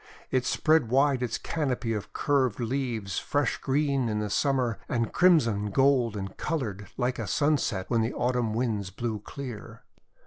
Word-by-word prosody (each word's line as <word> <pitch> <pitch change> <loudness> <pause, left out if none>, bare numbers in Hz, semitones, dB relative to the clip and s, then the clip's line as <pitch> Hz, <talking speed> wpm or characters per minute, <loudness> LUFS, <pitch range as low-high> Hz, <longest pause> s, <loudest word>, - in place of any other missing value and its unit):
It 130 -1 +1
spread 155 -7 +3
wide 135 +1 +3
its 125 -3 -1
canopy 125 -7 -2
of 105 -2 -5
curved 130 -6 +1
leaves, 120 -6 -2
fresh 145 -3 0
green 135 -3 +1
in 105 -1 -1
Summer, 130 -5 +1
and 115 -2 -1
crimson, 115 - +4
gold, 125 -1 +3
and 95 -1 -5
coloured 110 - -3
like 125 0 -1
a - - -3
sunset 145 -10 +1
when 115 -2 +2
the 115 +2 -1
Autumn 120 -3 0
Winds 110 -5 -1
blew 110 +2 -3
clear. 120 +1 -8
125 Hz, 150 wpm, -27 LUFS, 110-140 Hz, -, crimson